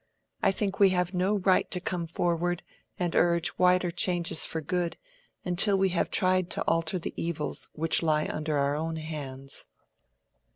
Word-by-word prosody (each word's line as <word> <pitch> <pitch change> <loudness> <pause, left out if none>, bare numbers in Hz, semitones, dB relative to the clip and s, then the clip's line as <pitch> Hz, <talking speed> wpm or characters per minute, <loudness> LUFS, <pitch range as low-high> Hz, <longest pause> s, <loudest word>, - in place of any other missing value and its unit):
I - - +4
think 195 0 -2
we 200 -1 +7
have 180 +1 0
no 185 +3 +1
right 190 -1 +2
to 180 - 0
come 175 -1 -3
forward 175 +1 -1 0.3
and 175 -2 -2
urge 170 -1 +2
wider 180 -1 +3
changes 170 -1 +3
for 160 - -1
good, 170 +2 -2 0.5
until 195 +3 +3
we 190 0 +2
have 175 -1 0
tried 185 -2 +2
to - - 0
alter 165 +2 0
the 170 - -5
evils 165 -3 -4
which 165 +1 +2
lie 155 -2 +1
under 155 -1 -2
our 140 +1 +1
own 160 +2 -3
hands." 140 -4 -5
175 Hz, 165 wpm, -28 LUFS, 160-185 Hz, 0.5 s, we